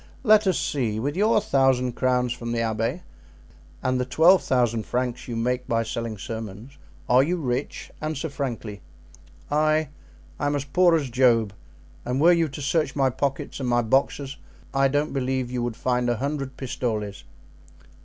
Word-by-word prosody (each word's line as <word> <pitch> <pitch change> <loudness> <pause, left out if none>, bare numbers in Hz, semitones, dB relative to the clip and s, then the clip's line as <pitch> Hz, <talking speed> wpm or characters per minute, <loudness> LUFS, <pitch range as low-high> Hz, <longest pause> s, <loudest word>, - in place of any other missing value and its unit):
Let 215 -3 +5
us 185 - +2
see; 115 -7 -1
with 145 +6 -2
your 215 +3 +3
thousand 135 -7 +2
crowns 125 -1 +1
from 120 -1 -5
the 115 - -1
abbey 115 0 -1 0.8
and 130 0 +1
the - - +1
twelve 165 +8 +5
thousand 120 -4 0
francs 125 0 -2
you 120 - -4
make 125 +2 -1
by 115 -2 +1
selling 115 -1 -4
sermons, 115 +4 -7 0.3
are 125 +1 +5
you 170 +6 0
rich? 130 -3 -3
Answer 155 0 -3
frankly." 120 -7 -5 0.7
"I? 155 0 +2 0.5
I 145 - 0
am 145 - 0
as 140 -1 -2
poor 175 +4 +4
as 140 -6 -1
Job, 115 -4 +3 0.5
and 125 +2 -2
were 170 +4 +6
you 165 -1 +2
to 145 0 -7
search 150 0 0
my 135 -2 +2
pockets 140 +2 -3
and 130 -2 -2
my 120 0 +2
boxes 135 +3 0 0.4
I 135 0 +3
don't 145 +2 0
believe 130 -2 -1
you 125 -1 -2
would 120 -2 -3
find 125 -1 0
a 120 - 0
hundred 135 0 -3
pistoles." 110 -6 -3
130 Hz, 170 wpm, -24 LUFS, 120-145 Hz, 0.8 s, were